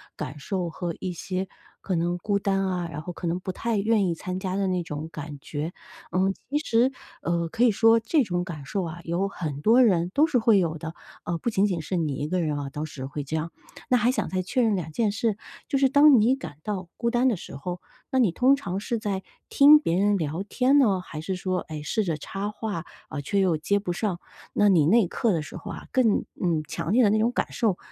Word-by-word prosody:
感 135 +3 -6
受 180 +2 -3
和 170 0 -4
一 185 - -3
些 185 +2 -3 0.3
可 185 - -2
能 175 +1 0
孤 200 +3 0
单 195 -1 0
啊、 180 -2 -2
然 150 - -5
后 180 - -6
可 175 - -7
能 170 +1 0
不 185 - -4
太 225 +3 -2
愿 210 0 +2
意 170 - +1
参 185 +2 -5
加 185 -1 -3
的 195 -1 0
那 180 -1 0
种 155 0 -6
感 150 -1 -7
觉。 155 +5 -4 0.4
嗯， 190 +1 +2 0.2
其 295 - +2
实， 245 -3 +2 0.3
呃， 170 0 0
可 230 - 0
以 240 - +6
说 225 +2 +5
这 280 +7 +2
种 180 -4 -1
感 155 -6 -7
受 195 +4 -1
啊， 175 0 -6
有 175 +4 -1
很 155 -7 -5
多 235 +9 +5
人 180 -6 +3
都 305 +3 +4
是 275 -5 +2
会 225 -3 +4
有 165 -2 -1
的， 160 +1 -6 0.3
呃， 170 -1 -2
不 235 - -1
仅 200 -2 +2
仅 180 -5 -1
是 180 +3 -3
你 155 -4 0
一 145 - -2
个 185 +2 0
人 155 -3 0
哦， 140 - -4
当 150 +2 -4
时 135 -4 -7
会 145 +1 -5
这 145 +3 -4
样。 160 +1 -2 0.4
那 250 - +5
还 240 +2 +3
想 255 - -2
再 185 -1 -1
确 250 +7 0
认 220 -3 +3
2 165 -4 -4
件 215 +5 +1
事， 215 0 -1 0.3
就 275 - +1
是 270 - +5
当 285 -1 +7
你 235 +5 +4
感 160 - -9
到 195 -4 -4
孤 235 0 0
单 245 +2 +2
的 220 - 0
时 140 - -9
候， 175 +5 -5 0.3
那 265 - +2
你 220 -9 +4
通 260 +6 +4
常 195 -8 -4
是 230 +1 -2
在 195 -3 -3 0.2
听 295 +2 +7
别 175 - 0
人 205 +1 +3
聊 160 +2 -2
天 255 +7 +2
呢， 205 -9 +3
还 155 -4 -8
是 190 +3 -3
说， 185 0 -1
哎， 155 -1 -5
试 215 +8 -1
着 165 -5 -1
插 195 +6 -4
话， 210 -6 -4 0.3
呃， 145 - -4
却 200 +8 0
又 185 -4 +3
接 200 +7 +1
不 180 -3 -3
上？ 185 -2 -2 0.3
那 205 - +4
你 175 -7 +5
那 225 +8 +5
一 - - -1
刻 225 +5 0
的 165 -4 0
时 150 - -9
候 - - -7
啊， - - -9
更 240 -5 +3 0.2
嗯， 170 -4 +1
强 165 0 -3
烈 245 +4 +5
的 210 - +5
那 215 - +3
种 230 +2 +2
感 - - -1
受 210 -6 +1
185 Hz, 265 characters per minute, -26 LUFS, 165-225 Hz, 0.4 s, 当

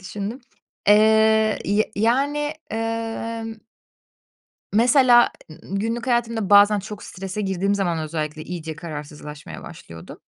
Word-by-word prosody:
düşündüm. 205 +6 -6 0.5
Eee, 220 +1 +4
y 205 +2 0
yani, 280 +7 +1 0.2
emm 225 0 -4 1.2
Mesela 240 +2 +5 0.2
ı - - -9
ııı, 190 - -8
günlük 230 +3 -3
hayatımda 230 -4 0
bazen 205 +1 +6
çok 205 +1 -8 0.4
girdiğim 195 +1 0
zaman 180 -4 -1
özellikle 155 -1 -4
iyice 160 -2 -6
kararsızlaşmaya 150 -2 -9
başlıyordum. 80 0 -11
210 Hz, 105 wpm, -22 LUFS, 175-230 Hz, 1.2 s, bazen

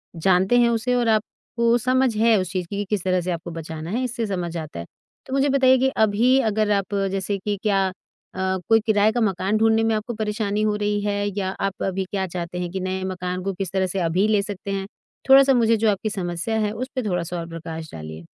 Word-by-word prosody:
जानते 190 +6 +3
हैं 235 - +4
उसे। 235 +2 0
और 240 -1 +1
आपको 230 +2 0
समझ 255 -1 +1
है 225 0 +4
उस 185 -2 -3
चीज़ 180 -2 -3
की 200 - -5
कि 205 - -2
किस 210 -4 -1
तरह 185 -1 +1
से 180 +1 -3
आपको 170 +1 -5
बचाना 160 0 -6
है 245 +4 -1
इससे 240 -2 -2
समझ 175 -4 -3
आता 155 - -6
है। 85 - -6 0.4
तो 265 - -6
मुझे 275 +1 +2
बताइए 260 -1 +5
कि 265 +1 +2
अभी 235 +6 +3
अगर 210 0 +1
आप 200 0 0 0.2
जैसे 195 +1 -2
कि 205 +1 -3
क्या 195 -3 +2 0.5
अ, - - -6 0.3
कोई 225 0 +6
किराए 215 -1 +3
का 240 +1 -1
मकान 195 0 +1
ढूँढने 225 0 +3
में 225 0 +2
आपको 215 +3 -3
परेशानी 210 -1 -1
हो 215 -1 +1
रही 210 0 0
है? 205 0 -1
या 190 -1 -1
आप 195 -1 -2
अभी 190 0 -1
क्या 195 -2 -1
चाहते 180 0 -5
हैं 175 - -3
कि 190 - -3
नए 185 0 -3
मकान 180 -1 -4
को 195 - -2
किस 190 -1 -4
तरह 190 -1 +1
से 190 +1 -3
अभी 175 +4 +1
ले 215 -2 +3
सकते 200 0 -6
हैं। 195 -1 -2 0.4
थोड़ा-सा 270 0 +7
मुझे 230 -2 +3
जो 220 0 +2
आपकी 205 +2 -2
समस्या 180 +2 -2
है 210 -1 0
उस 250 +4 -4
पे 255 - 0
थोड़ा-सा 175 -1 -2
और 165 - -6
प्रकाश 165 -1 -7
डालिए? 80 0 -8
200 Hz, 235 wpm, -23 LUFS, 180-225 Hz, 0.5 s, थोड़ा-सा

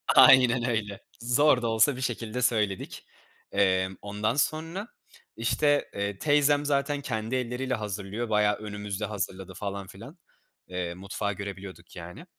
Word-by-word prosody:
aynen 125 -2 +7
öyle 105 -4 -2 0.2
zor 125 +3 +4
da 115 - 0
olsa 115 +5 +3
bir 130 - -7
şekilde 120 -1 -3
söyledik. 105 -5 0 0.5
Emm, 95 -1 +2
ondan 105 +3 -1
sonra, 165 +8 -1 0.5
işte, 145 +5 +2
eee, 100 0 -3
teyzem 145 -1 +3
zaten 140 0 0
kendi 115 -2 -3
elleriyle 130 +1 -2
hazırlıyor, 105 +1 -4
bayağı 105 -1 +3
önümüzde 105 -1 -5
hazırladı 95 -2 -4
falan 100 0 -5
filan, 115 - -12 0.5
eee, 90 -1 -3
mutfağı 100 +2 -3
görebiliyorduk, 95 -3 -8
yani. 90 - -9
110 Hz, 130 wpm, -27 LUFS, 100-130 Hz, 0.5 s, aynen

